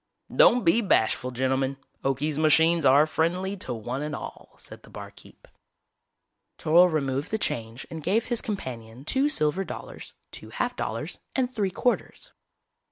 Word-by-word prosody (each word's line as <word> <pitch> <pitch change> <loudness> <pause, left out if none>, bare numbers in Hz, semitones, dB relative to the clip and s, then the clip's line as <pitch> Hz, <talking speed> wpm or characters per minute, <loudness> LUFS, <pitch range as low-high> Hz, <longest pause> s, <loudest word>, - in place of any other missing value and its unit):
"Don't 250 - +6
be 185 +7 +4
bashful, 125 - +1
gentlemen. 130 +2 -1 0.3
Okie's 140 +3 -1
machines 160 0 +4
are 140 +3 +6
friendly 180 +5 -1
to 155 - -5
one 120 +3 -4
and 150 +1 -3
all," - - -9
said - - -12
the - - -17
barkeep. - - -12 1.1
Toryl 175 +3 +5
removed 140 -1 -1
the 220 - 0
change 115 - -3
and 160 -1 -6
gave 215 +9 +1
his 240 -2 -1
companion 130 - -6
two 270 - +2
silver 175 - +1
dollars, - - -9 0.2
two - - -10
half - - -2
dollars - - -4 0.2
and 255 -1 0
three 205 -5 0
quarters. 250 - -2
155 Hz, 150 wpm, -26 LUFS, 135-195 Hz, 1.1 s, Don't